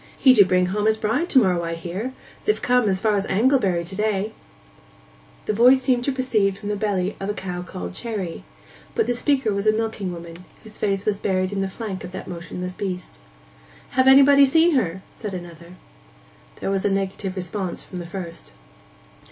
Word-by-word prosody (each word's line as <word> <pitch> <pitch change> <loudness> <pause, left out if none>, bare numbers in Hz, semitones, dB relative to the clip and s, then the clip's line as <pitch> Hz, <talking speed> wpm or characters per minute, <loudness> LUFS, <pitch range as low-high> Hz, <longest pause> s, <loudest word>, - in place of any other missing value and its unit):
'He 260 - +6
do 210 - +8
bring 180 0 +2
home 205 +3 0
his 220 0 +3
bride 225 +12 0
to - - +3
morrow, 185 -8 +4
I 165 0 -3
hear. 180 +9 -5 0.3
They've 425 - +2
come 245 -3 +2
as 190 -1 0
far 215 0 +2
as 200 0 -1
Anglebury 200 -5 +2
to 185 +3 -5
day.' 210 0 -1 1.1
The 215 - 0
voice 250 +4 +5
seemed 250 -2 +2
to 280 - +1
proceed 225 -7 +1
from 205 - -6
the 210 - 0
belly 200 -2 -1
of 195 - -4
the 205 - -2
cow 180 -3 -5
called 90 - -7
Cherry, 200 - -5 0.5
but 450 - +2
the - - 0
speaker 260 -3 +1
was 200 +1 -2
a - - +7
milking 215 -4 -2
woman, 170 +1 -9 0.2
whose 220 - -12
face 195 -1 0
was 205 -2 0
buried 185 -2 0
in 200 -1 -2
the 195 - 0
flank 195 -2 -6
of 180 +1 -8
that 190 - -7
motionless 180 +1 -6
beast. 180 - -5 0.7
'Hav' 260 +1 +3
anybody 280 +1 +8
seen 320 +5 +5
her?' 190 - 0
said 210 -4 -5
another. 175 0 -10 0.9
There - - -1
was 195 -1 0
a - - +2
negative 195 0 -2
response 185 0 -4
from 180 - -8
the 170 - -7
first. 170 - -8
200 Hz, 195 wpm, -23 LUFS, 180-225 Hz, 1.1 s, do